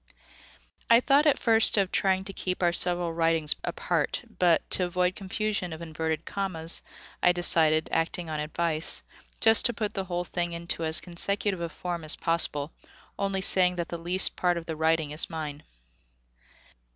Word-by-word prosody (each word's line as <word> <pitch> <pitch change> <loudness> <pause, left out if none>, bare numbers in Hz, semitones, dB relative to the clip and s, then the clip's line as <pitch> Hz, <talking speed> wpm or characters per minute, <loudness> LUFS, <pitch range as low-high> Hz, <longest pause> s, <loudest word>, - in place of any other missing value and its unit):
I 230 0 +7
thought 280 +4 +2
at 290 - +3
first 225 -1 +4
of 195 -2 0
trying 190 -1 0
to 195 - -8
keep 185 0 -4
our 175 -1 +2
several 175 -1 +2
writings 165 -2 +1
apart; - - -2 0.2
but, 175 -2 +2
to 185 - +3
avoid 180 +1 -1
confusion 200 -2 -3
of 160 - -9
inverted 160 -1 -4
commas, 175 -5 -3 0.4
I 180 - +4
decided, 160 -3 +3
acting 165 +1 -2
on 155 -1 -4
advice, 155 +1 -1 0.4
just 225 -1 +5
to 240 - -4
put 210 -1 -4
the 195 -2 -4
whole 175 -1 -3
thing 175 -1 -4
into 170 0 -3
as 160 0 +4
consecutive 190 +2 -2
a 170 - -4
form 175 0 -6
as 155 - +5
possible, 160 -3 +1 0.5
only 195 -1 -1
saying 180 -1 +4
that 170 -2 -4
the 170 - -6
least 180 +3 +1
part 175 -1 0
of 165 - -7
the 160 - -5
writing 160 -1 0
is 150 +2 +2
mine. 150 -2 -6
175 Hz, 170 wpm, -26 LUFS, 165-190 Hz, 0.5 s, I